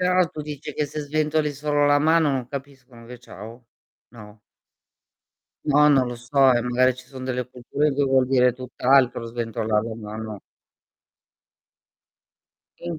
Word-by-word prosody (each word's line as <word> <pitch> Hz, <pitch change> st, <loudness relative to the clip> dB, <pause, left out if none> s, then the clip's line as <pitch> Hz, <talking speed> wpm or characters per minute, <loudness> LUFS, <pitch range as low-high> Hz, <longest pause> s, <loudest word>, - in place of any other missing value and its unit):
Però 180 Hz, 0 st, +3 dB
tu 155 Hz, -, -8 dB
dici 150 Hz, 0 st, -7 dB
che 150 Hz, -, -2 dB
se 150 Hz, -, -6 dB
sventoli 150 Hz, 0 st, -1 dB
solo 145 Hz, +1 st, 0 dB
la 145 Hz, 0 st, +4 dB
mano 160 Hz, 0 st, +3 dB
non 130 Hz, -3 st, -2 dB
capiscono 135 Hz, -3 st, -10 dB
che 125 Hz, -, -9 dB
è -, -, -13 dB
"ciao"? 115 Hz, +1 st, -12 dB, 0.4 s
No? 105 Hz, -2 st, -14 dB, 1.3 s
No, 150 Hz, 0 st, +4 dB
non 135 Hz, -3 st, +3 dB
lo 120 Hz, -, -5 dB
so, 130 Hz, +2 st, +3 dB
eh, 120 Hz, -, +1 dB
magari 125 Hz, +1 st, +2 dB
ci 125 Hz, 0 st, -13 dB
son 130 Hz, 0 st, -10 dB
delle 125 Hz, -1 st, -3 dB
culture 135 Hz, +4 st, -2 dB
che 145 Hz, -, +1 dB
vuol 130 Hz, -1 st, +2 dB
dire 125 Hz, -1 st, +3 dB
tutt'altro 125 Hz, -1 st, +1 dB
sventolar 115 Hz, -2 st, -2 dB
la 115 Hz, -1 st, -5 dB
mano. 110 Hz, -1 st, -7 dB, 2.4 s
E -, -, -25 dB
in 170 Hz, -, -3 dB
130 Hz, 155 wpm, -23 LUFS, 120-145 Hz, 2.4 s, la